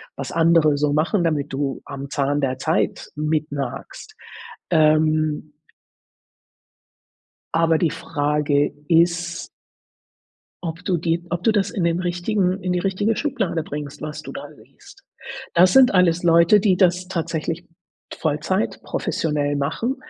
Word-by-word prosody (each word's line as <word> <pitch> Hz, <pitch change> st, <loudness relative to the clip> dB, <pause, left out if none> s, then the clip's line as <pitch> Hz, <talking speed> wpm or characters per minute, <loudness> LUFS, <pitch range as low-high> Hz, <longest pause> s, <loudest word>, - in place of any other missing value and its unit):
was -, -, -6 dB
andere 165 Hz, -3 st, +3 dB
so 145 Hz, 0 st, +1 dB
machen, 165 Hz, +5 st, +1 dB
damit 150 Hz, -4 st, -1 dB
du 135 Hz, 0 st, -2 dB
am 140 Hz, 0 st, -7 dB
Zahn 145 Hz, +1 st, 0 dB
der 130 Hz, -2 st, -1 dB
Zeit 160 Hz, +5 st, -1 dB
mit 150 Hz, 0 st, -1 dB
nagst, 140 Hz, -4 st, -6 dB, 0.5 s
ähm 155 Hz, -1 st, +2 dB, 2.0 s
Aber 165 Hz, 0 st, +3 dB
die 170 Hz, -, +2 dB
Frage 145 Hz, 0 st, 0 dB, 0.2 s
ist 170 Hz, 0 st, +1 dB, 1.1 s
ob 165 Hz, 0 st, -5 dB
du 180 Hz, -3 st, 0 dB
die 170 Hz, +1 st, -1 dB
ob 175 Hz, 0 st, -3 dB
du 225 Hz, -, +4 dB
das 205 Hz, -2 st, +1 dB
in 185 Hz, -, -2 dB
den 170 Hz, +1 st, +1 dB
richtigen 180 Hz, +2 st, -1 dB
in 180 Hz, -1 st, -1 dB
die 180 Hz, -, 0 dB
richtige 200 Hz, +4 st, 0 dB
Schublade 215 Hz, -, -2 dB
bringst, 145 Hz, -1 st, -7 dB
was 150 Hz, 0 st, -6 dB
du -, -, -9 dB
da 275 Hz, +1 st, -7 dB
liest. 395 Hz, -, -18 dB, 0.5 s
Das 180 Hz, +2 st, +5 dB
sind 260 Hz, -4 st, +6 dB
alles 175 Hz, -2 st, +3 dB
Leute, 170 Hz, +4 st, +5 dB
die 195 Hz, -2 st, +3 dB
das 180 Hz, 0 st, +2 dB
tatsächlich 165 Hz, -1 st, -3 dB, 0.5 s
Vollzeit 155 Hz, +6 st, -1 dB
professionell 145 Hz, -2 st, -1 dB
machen 160 Hz, -, -1 dB
165 Hz, 135 wpm, -22 LUFS, 150-180 Hz, 2.0 s, sind